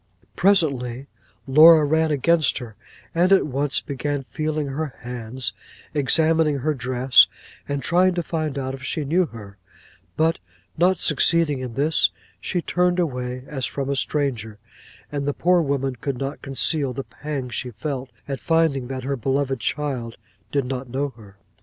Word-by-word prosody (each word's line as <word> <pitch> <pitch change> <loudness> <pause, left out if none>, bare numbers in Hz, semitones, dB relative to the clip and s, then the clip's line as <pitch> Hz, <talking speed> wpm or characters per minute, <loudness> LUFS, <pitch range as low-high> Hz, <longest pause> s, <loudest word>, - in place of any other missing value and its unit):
Presently 140 -10 +1 0.4
Laura 155 +3 +8
ran 160 +2 +2
against 155 +1 +2
her, 120 -5 -8 0.4
and 175 +3 +3
at 195 - +5
once 140 0 0
began 140 0 -3
feeling 155 +2 -2
her 140 0 -4
hands, 120 0 -4 0.4
examining 155 +1 +2
her 150 +3 0
dress, 130 0 +4 0.4
and 140 -1 -2
trying 180 +1 +3
to 175 - -1
find 155 -4 -3
out 130 -1 -3
if 135 - -8
she 145 +2 -2
knew 170 +5 +2
her; 100 -5 -11 0.6
but 160 +1 +2 0.4
not 180 +1 +3
succeeding 150 -1 +2
in 125 -3 -6
this, 150 +3 +3 0.3
she 175 -2 -2
turned 180 0 +1
away 125 -6 -2
as 135 -3 -3
from 140 +1 -3
a - - 0
stranger, 125 -7 -1 0.5
and 140 -1 -3
the 145 - -1
poor 180 0 +3
woman 135 -3 -1
could 130 +2 -4
not 135 +3 -4
conceal 135 0 0
the 135 +2 -4
pang 140 -3 -5
she 125 +1 -4
felt, 130 +2 -5 0.2
at 135 -2 -4
finding 160 -6 +1
that 130 0 -5
her 140 +2 -1
beloved 135 +1 -1
child 125 -2 -2 0.3
did 140 -2 0
not 130 0 -4
know 140 +3 -1
her. 105 -6 -16
140 Hz, 160 wpm, -23 LUFS, 130-155 Hz, 0.6 s, Laura